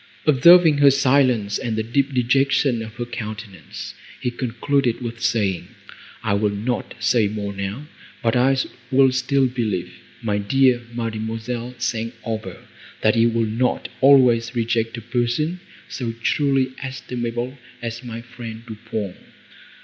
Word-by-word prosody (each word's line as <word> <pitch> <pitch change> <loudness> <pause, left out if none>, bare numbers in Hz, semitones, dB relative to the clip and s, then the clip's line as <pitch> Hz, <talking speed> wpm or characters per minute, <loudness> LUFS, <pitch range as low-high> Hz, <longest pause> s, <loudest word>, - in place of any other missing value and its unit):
Observing 155 +2 +7
her 140 -1 +8
silence 130 -6 +2
and 115 -2 -2
the 110 - -1
deep 135 +5 0
dejection 130 0 +2
of 110 -1 -8
her 120 +1 -4
countenance, 110 -5 -7 0.3
he 125 - -2
concluded 125 +1 0
with 120 -2 -6
saying, 100 -7 0 0.6
"I - - +1
will 105 +1 +2
not 110 +5 -3
say 115 -4 +2
more 100 -1 -4
now, 100 +8 -5 0.4
but 115 0 +2
I 130 +2 +3 0.3
will 135 -1 +5
still 135 +1 +2
believe, 110 -8 -2 0.3
my 105 -2 0
dear 125 +4 +3
Mademoiselle 115 +1 -4
St. 120 -1 -2
Aubert, 110 -5 -5 0.4
that 110 - +3
you 115 +1 +4
will 115 0 +1
not 115 +4 -1
always 125 -4 +5
reject 115 0 0
a - - -6
person, 120 +9 -1 0.3
so 120 -3 -4
truly 135 +3 +1
estimable 125 -1 -4 0.2
as 120 +1 -5
my 115 -1 -6
friend 115 -1 -9
Du 110 -3 -8
Pont." 100 -4 -3
120 Hz, 140 wpm, -22 LUFS, 110-130 Hz, 0.6 s, her